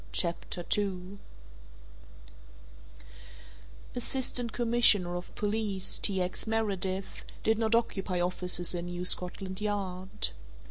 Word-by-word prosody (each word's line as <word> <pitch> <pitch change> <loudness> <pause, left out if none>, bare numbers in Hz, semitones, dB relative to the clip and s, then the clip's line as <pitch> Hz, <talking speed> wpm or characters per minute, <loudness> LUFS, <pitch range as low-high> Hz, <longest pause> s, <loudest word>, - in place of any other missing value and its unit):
CHAPTER 170 - -1
II 195 -1 -3 2.7
Assistant 245 -1 0
Commissioner 225 -7 +5
of 175 +1 -7
Police 210 -2 0
T. 195 -2 +3
X. 180 +4 -4
Meredith 195 -4 -2 0.2
did 220 0 +2
not 225 0 +2
occupy 195 -5 0
offices 180 0 +2
in 175 0 -4
New 175 0 -4
Scotland 185 +2 -1
Yard. 190 -3 -2
195 Hz, 95 wpm, -30 LUFS, 180-220 Hz, 2.7 s, Commissioner